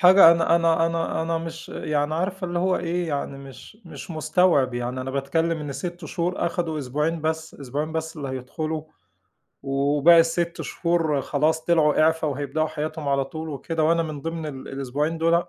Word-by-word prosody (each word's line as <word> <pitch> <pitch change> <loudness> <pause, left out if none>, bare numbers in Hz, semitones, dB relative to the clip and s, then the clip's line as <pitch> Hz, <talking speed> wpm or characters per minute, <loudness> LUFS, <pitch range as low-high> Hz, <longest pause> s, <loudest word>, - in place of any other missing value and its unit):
حاجة 185 -2 +9
أنا 170 0 +4
أنا 165 -1 +3
أنا 165 -1 -1
أنا 165 0 -1
مش 165 0 -7
يعني 150 0 -1
عارفة 185 +2 -2
اللي 175 0 -2
هو 185 +1 +2
إيه؟ 175 0 -2
يعني 140 -1 -3
مش 135 +9 -12
مش - - -9
مستوعب 155 -4 +2
يعني، 125 +1 -3
أنا 130 +1 -4
باتكلم 160 +5 0
إن 145 -2 -5
6 175 +2 -6
شهور 170 +4 -1
أخدوا 170 -2 -2
أسبوعين 150 +5 -1
بس، 160 0 -2
أسبوعين 145 +3 -4
بس 160 0 -3
اللي 140 -3 -5
هيدخلوا. 155 +5 -4 0.8
وباقي 145 +4 +5
ال6 170 +1 0
شهور 165 -4 0
خلاص 155 +2 0
طلعوا 155 -4 +3
إعفا، 160 0 +2
وهيبدأوا 145 +3 -1
حياتهم 155 -1 -4
على 140 -1 +2
طول 160 +3 -7
وكده 155 +3 -2
وأنا 165 +1 +3
من 155 -3 -5
ضمن 165 -1 -4
ال 135 -3 -7
الأسبوعين 140 +4 -2
دُولَة. 170 +1 +2
160 Hz, 175 wpm, -24 LUFS, 145-165 Hz, 0.8 s, حاجة